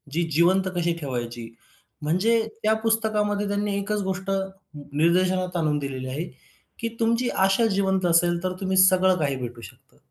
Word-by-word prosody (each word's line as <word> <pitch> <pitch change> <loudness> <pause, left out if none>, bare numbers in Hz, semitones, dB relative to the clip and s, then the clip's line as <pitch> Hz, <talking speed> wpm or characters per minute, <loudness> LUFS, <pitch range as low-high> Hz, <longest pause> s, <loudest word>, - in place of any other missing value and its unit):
ती 170 - +2
जिवंत 185 +5 +3
कशी 170 -1 +1
ठेवायची? 120 -5 -5 0.5
म्हणजे 185 +10 +2 0.2
त्या 215 +1 +4
पुस्तकामध्ये 210 -2 0
त्यांनी 205 0 -1
एकच 205 +1 -2
गोष्ट 190 0 -4 0.6
निर्देशनात 180 +3 +1
आणून 155 -3 +1
दिलेली 135 -2 -5
आहे, 135 +5 -3 0.6
की 230 - -2
तुमची 230 +2 +1
आशा 195 +4 +2
जिवंत 190 -1 +1
असेल, 175 0 +2
तर 185 0 -1
तुम्ही 190 0 0
सगळं 185 0 +5
काही 140 -3 0
भेटू 120 -2 -7
शकतं. - - -15
185 Hz, 150 wpm, -24 LUFS, 155-200 Hz, 0.6 s, सगळं